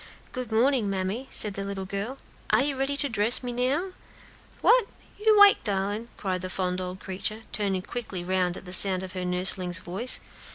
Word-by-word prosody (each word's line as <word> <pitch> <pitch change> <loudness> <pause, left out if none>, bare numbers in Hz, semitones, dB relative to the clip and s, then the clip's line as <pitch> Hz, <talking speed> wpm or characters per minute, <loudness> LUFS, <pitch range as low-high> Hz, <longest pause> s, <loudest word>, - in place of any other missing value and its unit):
"Good 250 -3 -6
morning, 235 -1 +2
mammy," 195 +7 -3
said 210 -2 +1
the 195 - -5
little 195 -1 -5
girl. 200 +7 -5 0.3
"Are - - +3
you 285 -1 -1
ready 270 +1 -1
to 285 - +1
dress 225 +1 +4
me 245 - -3
now?" 270 +10 -1 0.7
"What, 485 -3 +4 0.3
you 430 0 +4
'wake, 405 -1 +7
darlin'?" 205 +2 -2
cried 185 -3 -3
the 185 - -5
fond 185 -1 -2
old 180 +1 -6
creature, 195 +4 -4
turning 195 -3 -1
quickly 200 -6 -6
round 180 0 -1
at - - -11
the 180 - -7
sound 190 -1 +6
of 185 -1 -8
her 185 -1 -4
nursling's 180 0 0
voice. 190 +7 +2
200 Hz, 190 wpm, -26 LUFS, 185-250 Hz, 0.7 s, wake